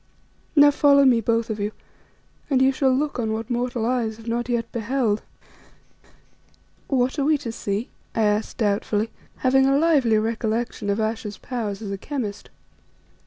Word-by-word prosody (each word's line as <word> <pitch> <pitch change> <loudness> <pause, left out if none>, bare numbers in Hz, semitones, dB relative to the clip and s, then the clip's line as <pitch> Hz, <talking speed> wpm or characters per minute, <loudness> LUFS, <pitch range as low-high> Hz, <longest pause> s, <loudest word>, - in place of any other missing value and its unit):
Now 290 -1 +7
follow 280 -1 +5
me, 245 -3 +5
both 230 +1 0
of 215 - -4
you, 205 +1 -2 0.8
and 270 -3 +3
ye 265 +1 +5
shall 270 0 +1
look 280 0 -1
on 220 -2 -1
what 225 +2 -4
mortal 245 -1 -1
eyes 230 -3 -1
have 225 0 -13
not 240 +1 -2
yet 235 -1 -1
beheld." 230 -2 0 1.7
"What 260 +1 0
are - - +2
we 305 0 +3
to 235 -4 -5
see?" 210 +1 -3 0.2
I 225 - +2
asked 210 +1 0
doubtfully, 210 0 0 0.3
having 265 +1 +5
a 275 0 +3
lively 285 -8 +3
recollection 225 -1 -2
of 200 +2 0
Ayesha's 220 -1 -3
powers 220 -5 -4
as 200 - -5
a 195 - -4
chemist. 225 -8 -5
230 Hz, 165 wpm, -23 LUFS, 220-265 Hz, 1.7 s, Now